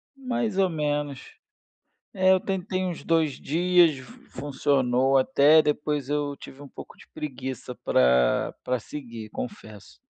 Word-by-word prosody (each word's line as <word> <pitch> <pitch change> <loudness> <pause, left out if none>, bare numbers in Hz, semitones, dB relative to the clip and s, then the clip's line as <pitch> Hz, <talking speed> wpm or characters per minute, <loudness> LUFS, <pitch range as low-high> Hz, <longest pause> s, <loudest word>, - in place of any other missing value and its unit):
Mais 240 -6 -3
ou 190 -1 +3
menos. 145 -3 -3 0.8
É, 190 -2 +3
eu 190 - +4
tentei 185 -1 -3
uns 180 -3 -4
2 160 -4 +1
dias, 175 -1 +3
fun 130 -1 -13
funcionou 135 -1 +2
até, 150 +2 +5
depois 150 -2 -2
eu 145 -1 -1
tive 140 0 -13
um 145 - -10
pouco - - -12
de - - -17
preguiça 130 -3 -6
para, 65 -1 +2
para 125 -1 -1
seguir, 115 -4 -9
confesso. 205 - -9
145 Hz, 135 wpm, -25 LUFS, 130-180 Hz, 0.8 s, até